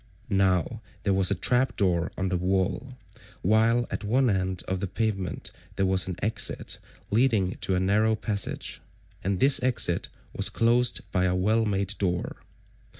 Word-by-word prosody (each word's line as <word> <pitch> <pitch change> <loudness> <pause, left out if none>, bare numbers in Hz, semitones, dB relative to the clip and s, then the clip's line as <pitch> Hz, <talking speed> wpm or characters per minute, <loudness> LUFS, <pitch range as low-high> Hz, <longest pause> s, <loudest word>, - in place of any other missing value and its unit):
Now 95 +3 +1 0.2
there 100 - +2
was 95 -1 +2
a 100 - +1
trap 125 +7 +2
door169 90 -4 +1
on 95 0 -1
the 90 - 0
wall, 95 +8 -1 0.5
while 115 +4 +3
at - - -4
one 120 +3 +2
end 95 -2 -1
of 95 0 -2
the 100 - -2
pavement170 100 -1 -3 0.2
there 95 - +1
was 95 -1 +1
an 90 - -3
exit 110 0 0 0.3
leading 110 -5 +2
to 95 - +1
a - - +1
narrow 105 +4 +2
passage, 105 -2 -2 0.4
and 95 -1 -1
this 135 -1 +5
exit 125 -9 +1 0.2
was - - +2
closed 120 +1 +2
by 90 -1 +1
a 90 0 +1
well 110 +5 +2
made 100 -1 -1
door. 90 -3 -1
100 Hz, 160 wpm, -26 LUFS, 95-115 Hz, 0.5 s, this